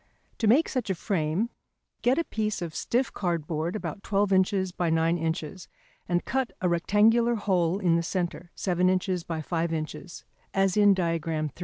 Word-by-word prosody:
To 225 - +1
make 275 +10 +5
such 255 -6 -3
a 190 - +1
frame, 180 +4 -1 0.5
get 250 +2 +3
a 335 - +2
piece 215 - -2
of 165 -2 -5
stiff 250 +9 -1
cardboard, 170 -1 -2
about 210 -1 -5
12 200 0 +1
inches 190 0 +2
by 175 -1 -1
9 165 +1 +2
inches, 165 +2 -3 0.4
and 175 0 0
cut 265 -1 -1
a 185 - +1
rectangular 215 +7 +3
hole 185 -4 +1
in 175 -4 +2
the - - +1
centre, 175 0 -3
7 180 -1 +1
inches 185 -1 0
by 165 -2 -4
5 165 +1 -1
inches, 160 +3 -5 0.3
as 195 -1 +2
in 205 -2 +6
Diagram 165 -3 -1
III. - - -19
180 Hz, 175 wpm, -27 LUFS, 165-205 Hz, 0.5 s, in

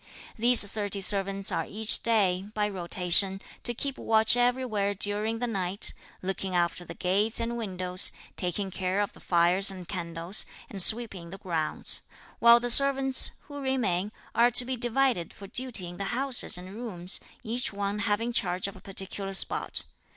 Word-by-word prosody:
These 235 -1 +6
thirty 205 0 -4
servants 195 0 +1
are - - -3
each 215 +1 0
day, 195 -5 +1
by 210 -1 0
rotation, 190 0 +1 0.2
to 240 - -3
keep 275 +3 -4
watch 220 +1 +3
everywhere 245 -5 0
during 210 +3 0
the 245 - -3
night, 195 -4 -3 0.3
looking 190 0 -4
after 175 0 -1
the - - -10
gates 200 +5 -1
and 235 +1 -3
windows, 185 -5 +1 0.2
taking 190 +2 -2
care 185 +1 -2
of 205 - -2
the - - -17
fires 175 +3 +2
and 185 -3 -7
candles, 170 0 0 0.2
and 195 - +4
sweeping 200 -5 +3
the 195 - -9
grounds; 165 -5 0 0.4
while 235 0 +7
the 245 0 +3
servants, 270 0 +6
who 285 -1 -10
remain, 220 -8 -1 0.2
are 235 +2 +4
to 245 +1 +1
be 260 +1 -3
divided 240 -6 0
for 200 - -11
duty 235 -4 -1
in 175 - -11
the 200 - -4
houses 255 -1 0
and 185 +2 -10
rooms, 200 -6 -2 0.2
each 240 +2 +1
one 200 +1 -4
having 225 +3 -1
charge 180 -4 -1
of 200 - -9
a - - -15
particular 195 0 -5
spot. - - +1
200 Hz, 165 wpm, -27 LUFS, 185-235 Hz, 0.4 s, while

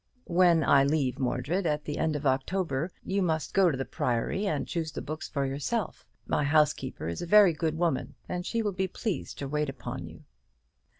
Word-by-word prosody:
"When 170 -2 +4
I 135 0 +5
leave 140 -3 0
Mordred, 140 +8 0
at 150 -1 -1
the 150 - -3
end 160 -1 +1
of 145 0 -4
October, 140 +3 0 0.2
you 195 +1 0
must 160 -6 -1
go 190 -2 +5
to 140 - -1
the 135 - -2
Priory, 125 - -1
and 150 -6 -1
choose 160 -2 -2
the - - -5
books 155 +1 -6
for 140 -1 -1
yourself. 145 - -3 0.2
My - - 0
housekeeper 145 - +1
is 85 - -4
a 175 - -4
very 205 -2 +7
good 160 0 -1
woman, 165 -5 -1
and 180 0 -3
she 230 +4 -1
will 205 - 0
be 190 +1 -1
pleased 200 +1 -4
to 140 - -4
wait 150 +1 -1
upon 135 -2 -6
you." - - -13
155 Hz, 200 wpm, -28 LUFS, 140-180 Hz, 0.2 s, very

